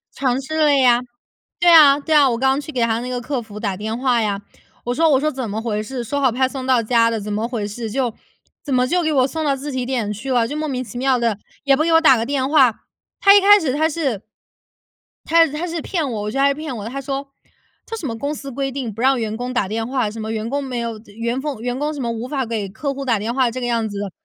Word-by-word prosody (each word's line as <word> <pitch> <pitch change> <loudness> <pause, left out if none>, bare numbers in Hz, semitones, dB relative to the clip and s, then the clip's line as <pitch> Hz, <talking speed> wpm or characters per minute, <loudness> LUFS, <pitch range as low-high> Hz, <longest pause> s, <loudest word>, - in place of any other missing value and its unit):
尝 260 -1 0
试 315 +4 -5
了 300 -2 +4
呀。 250 -3 +5 0.6
对 350 - +5
啊 290 -3 +8
对 310 +2 -2
啊， 285 -2 +6
我 235 - -1
刚 265 +2 +2
去 295 +2 -7
给 250 - -2
他 230 -1 +1
那 250 - -5
个 245 -1 -3
客 265 0 -3
服 210 -2 -10
打 200 -4 -2
电 220 +3 -4
话 250 -2 +2
呀。 205 -2 -1 0.4
我 245 - -1
说 325 +3 +3
我 270 - +4
说： 305 +2 +1
“怎 255 -4 -5
么 215 +2 -3
回 215 -2 -2
事， 245 +2 -5
说 285 +5 -2
好 260 -3 +3
派 260 +2 +1
送 260 -1 -6
到 255 -3 +4
家 230 0 +3
的， 225 - -2
怎 210 +1 -5
么 215 +3 -1
回 230 -4 -3
事， 225 +2 -5
就 250 -1 -1 0.5
怎 285 - -3
么 250 0 +3
就 350 +3 +1
给 315 - 0
我 260 -2 +3
送 315 +3 -3
到 280 -2 +2
自 280 +2 -6
提 255 -1 -2
点 240 -5 -2
去 230 +6 -5
了， 240 -2 +2
就 290 - -5
莫 310 0 -2
名 255 -3 -3
其 240 - -9
妙 260 0 +2
的， 230 -4 0 0.3
也 280 -1 +4
不 305 - +1
给 330 0 +1
我 325 - +6
打 270 -6 +6
个 225 - -1
电 265 0 -1
话。” 265 -7 +4 0.4
他 395 0 +7
一 - - +8
开 410 +1 +7
始 285 -6 -1
他 315 +3 +2
是 280 - -2 1.0
他 330 0 +5
他 305 +4 -4
是 330 -2 -4
骗 325 -8 -2
我， 215 -3 -3
我 210 - -3
觉 270 - -4
得 275 - +4
他 - - +6
是 - - +1
骗 305 -2 -6
我 210 - -6
的。 225 - -5
他 275 +3 -5
说， 275 +1 -4 0.6
这 455 - -6
什 410 -8 -6
么 225 -2 -4
公 285 +5 -3
司 275 -2 -7
规 270 +1 -3
定 255 -4 -4
不 225 - -7
让 265 0 +3
员 220 -1 -3
工 245 +2 -4
打 240 -6 0
电 225 +3 -3
话， 255 -5 0
什 225 - -8
么 220 +1 -4
员 220 0 -3
工 280 +3 -2
没 255 -3 -4
有 230 -1 -4 0.2
员 235 +2 -1
工 280 -6 -4
员 245 +1 -2
工 295 +2 -2
什 285 - -5
么 235 - -2
无 230 +2 -5
法 270 -2 -2
给 220 -3 -3
客 275 +8 -4
户 275 0 -6
打 230 -5 +1
电 220 +3 -3
话 255 -1 +2
这 255 - -5
个 245 - -2
样 230 -2 0
子 205 -1 -6
的。 200 -1 -4
255 Hz, 315 characters per minute, -20 LUFS, 230-280 Hz, 1.0 s, 啊